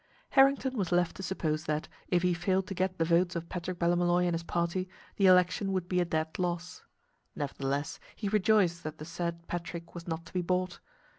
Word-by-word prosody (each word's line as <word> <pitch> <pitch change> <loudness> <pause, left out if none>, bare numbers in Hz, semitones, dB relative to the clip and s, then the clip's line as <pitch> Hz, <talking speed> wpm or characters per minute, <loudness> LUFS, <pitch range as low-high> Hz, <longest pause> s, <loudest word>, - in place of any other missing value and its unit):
Harrington 270 -1 +4
was 190 -7 -1
left 175 -1 +2
to - - -6
suppose 160 -5 -2
that, 150 0 -1 0.2
if 175 -1 +2
he 180 -1 +3
failed 185 +2 +1
to 195 - -5
get 185 0 -1
the 165 - +2
votes 175 +2 +2
of 170 0 -4
Patrick 180 0 -4
Ballymolloy 175 +1 +3
and 175 - +1
his 165 - -1
party, 170 +2 -1 0.3
the 195 - +5
election 185 +2 +4
would 185 -2 -1
be 180 0 +1
a 175 - +2
dead 160 0 -2
loss. 180 0 -3 0.5
Nevertheless, 140 0 -2 0.2
he 210 - -3
rejoiced 195 -4 +3
that 155 0 -5
the 155 - -7
said 170 0 -4
Patrick 170 0 -5
was 170 0 -8
not 165 0 -3
to - - -14
be 180 - +1
bought. 180 +1 -1
175 Hz, 205 wpm, -30 LUFS, 170-185 Hz, 0.5 s, the